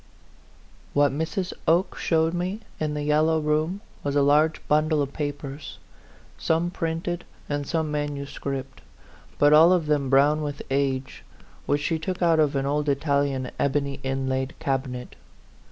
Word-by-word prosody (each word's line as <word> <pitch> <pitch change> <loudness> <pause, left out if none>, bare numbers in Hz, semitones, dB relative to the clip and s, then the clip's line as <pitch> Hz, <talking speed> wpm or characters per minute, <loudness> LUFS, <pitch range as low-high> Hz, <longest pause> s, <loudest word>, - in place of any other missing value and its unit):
WHAT 145 0 +4
Mrs. 160 +6 -2
Oke 170 +4 +3
showed 160 0 +1
me 185 +5 -2 0.2
in 150 -1 -1
the 150 - -2
yellow 155 +2 +3
room 155 +5 0 0.2
was 140 0 -1
a 145 - +4
large 150 +3 +3
bundle 155 +1 +2
of 140 -1 -1
papers, 145 -1 -5 0.6
some 165 +2 +1
printed 170 0 -3 0.2
and 145 -1 -2
some 160 -2 -1
manuscript, 140 -2 -4 0.6
but 145 +1 +5
all 160 +3 +8
of 180 -3 +2
them 145 -3 +1
brown 145 +3 +4
with 145 -1 -4
age, 135 -1 -1 0.4
which 145 0 +1
she 160 +2 0
took 180 +4 -3
out 165 -2 +3
of 150 -2 +2
an 135 0 0
old 145 +1 0
Italian 140 -2 0
ebony 140 0 0
inlaid 135 +1 -2
cabinet. 130 -2 -3
150 Hz, 145 wpm, -25 LUFS, 140-160 Hz, 0.6 s, all